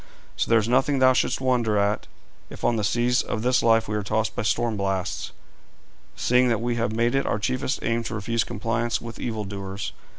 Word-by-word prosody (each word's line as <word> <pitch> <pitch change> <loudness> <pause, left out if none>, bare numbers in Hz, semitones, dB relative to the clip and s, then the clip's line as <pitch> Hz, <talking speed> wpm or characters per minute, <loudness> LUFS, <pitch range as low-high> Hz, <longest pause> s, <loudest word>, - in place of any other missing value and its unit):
So - - -1
there 115 - +5
is 110 -1 +1
nothing 135 +3 +2
thou 130 0 +5
shouldst - - +1
wonder 120 -5 +1
at, 100 +1 0 0.4
if - - -11
on 120 - +2
the 110 - -1
seas 120 +5 +2
of 110 - -4
this 125 +1 +3
life 115 -1 +3
we 105 - -2
are 105 - 0
tossed 110 +2 -1
by - - -1
storm 115 +1 0
blasts, 95 -2 -2 0.8
seeing 125 +1 +3
that 115 -3 +1
we 120 +1 -1
have 115 -1 0
made 115 +2 +1
it 135 0 +1
our - - +1
chiefest 125 +5 -1
aim 115 0 0
to 110 - -4
refuse 115 +2 0
compliance 115 +3 -2
with 115 -1 -9
evil 110 -3 -3
doers. 100 0 -5
115 Hz, 210 wpm, -24 LUFS, 105-120 Hz, 0.8 s, there